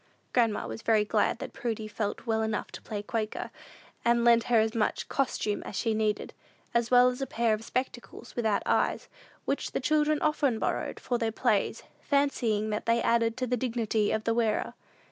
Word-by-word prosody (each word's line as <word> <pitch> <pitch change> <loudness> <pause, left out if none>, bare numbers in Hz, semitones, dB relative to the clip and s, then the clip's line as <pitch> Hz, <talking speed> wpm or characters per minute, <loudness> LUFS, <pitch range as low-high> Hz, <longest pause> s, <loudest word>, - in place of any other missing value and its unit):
Grandma 230 - +2
was 110 0 -6
very 215 -2 +3
glad 210 +1 +1
that - - -7
Prudy 225 -5 -3
felt 215 +1 -3
well 220 -2 +1
enough 220 -1 -2
to - - -9
play 205 -2 -5
Quaker, 215 0 -3 0.5
and 235 0 +3
lent 235 -1 +5
her 240 -1 +3
as 220 0 +1
much 225 -3 0
"costume" 235 -6 -1
as - - -8
she 225 +3 0
needed, 215 -1 -1 0.4
as 235 0 +1
well 250 0 +6
as 250 +2 -5
a 270 - -1
pair 235 -2 +1
of 215 +1 -3
spectacles 245 -1 -5
without 220 -4 +1
eyes, - - +1 0.4
which 280 - -2
the - - 0
children 300 +2 +2
often 290 -6 +1
borrowed - - -2
for 245 -1 -1
their 225 -1 0
plays, - - 0 0.2
fancying 235 -7 +1
that 210 +2 -3
they 230 0 +3
added 230 0 +2
to 255 - -1
the 250 0 0
dignity 225 -3 0
of 220 - -1
the 230 - +1
wearer. 225 -2 0
230 Hz, 190 wpm, -29 LUFS, 220-245 Hz, 0.5 s, well